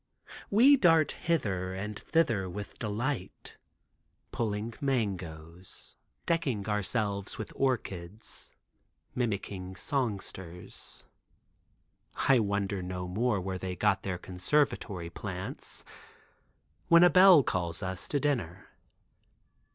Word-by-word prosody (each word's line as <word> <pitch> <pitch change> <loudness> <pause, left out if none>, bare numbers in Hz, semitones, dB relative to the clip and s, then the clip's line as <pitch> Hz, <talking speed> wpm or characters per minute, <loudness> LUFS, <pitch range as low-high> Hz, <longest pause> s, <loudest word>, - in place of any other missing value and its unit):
We 260 +8 +7
dart 165 - +5
hither 95 - -1
and 105 +2 -5
thither 115 - +1
with 100 +3 -7
delight, 115 +1 -3 0.8
pulling 110 0 -2
mangoes, 90 - -4 0.3
decking 135 -12 0
ourselves 105 -1 -1
with 110 - -6
orchids, 105 -6 -3 0.6
mimicking 100 -5 -3
songsters. 95 - -4 1.1
I 135 -3 +4
wonder 100 -2 -1
no 90 0 -4
more 110 +3 +1
where 95 0 -4
they 90 0 -4
get 95 +2 +2
their 95 -2 -3
conservatory 90 - -1
plants. 95 0 -5 1.0
When 170 +1 +7
a 180 - +8
bell 185 -5 +8
calls 90 -2 -2
us 95 0 -5
to 145 - 0
dinner. 115 - -2
100 Hz, 95 wpm, -30 LUFS, 95-130 Hz, 1.1 s, a